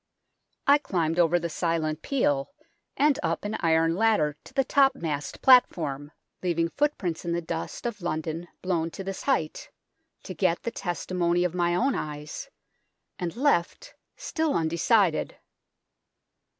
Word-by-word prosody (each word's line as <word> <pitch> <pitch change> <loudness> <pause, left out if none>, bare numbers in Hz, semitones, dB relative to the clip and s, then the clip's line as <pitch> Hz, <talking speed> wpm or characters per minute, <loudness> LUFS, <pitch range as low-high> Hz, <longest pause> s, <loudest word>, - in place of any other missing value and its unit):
I 285 +1 +6
climbed 170 - -1
over 175 0 +4
the 170 -1 -2
silent 160 -2 -1
peal, 145 - 0 0.5
and 290 0 +3
up - - -2
an 210 +1 -2
iron 165 0 +2
ladder 195 -8 +2
to - - -13
the 270 - +3
topmast 255 - 0
platform, 150 - +4 0.3
leaving 170 -2 0
footprints 200 - -1
in 170 -1 -2
the 170 - 0
dust 165 +5 -5
of 220 -4 -3
London 160 0 -3 0.2
blown 170 -3 0
to 195 - -7
this 195 0 -5
height, 210 - -1 0.5
to - - -6
get 170 - 0
the 235 - -2
testimony 175 -2 -1
of 180 -2 -1
my 175 -1 +1
own 265 +9 +2
eyes, 150 0 -5 0.7
and 175 +1 -3
left 245 -10 0 0.2
still 315 -2 -1
undecided. 170 +3 +2
175 Hz, 135 wpm, -27 LUFS, 160-220 Hz, 0.7 s, I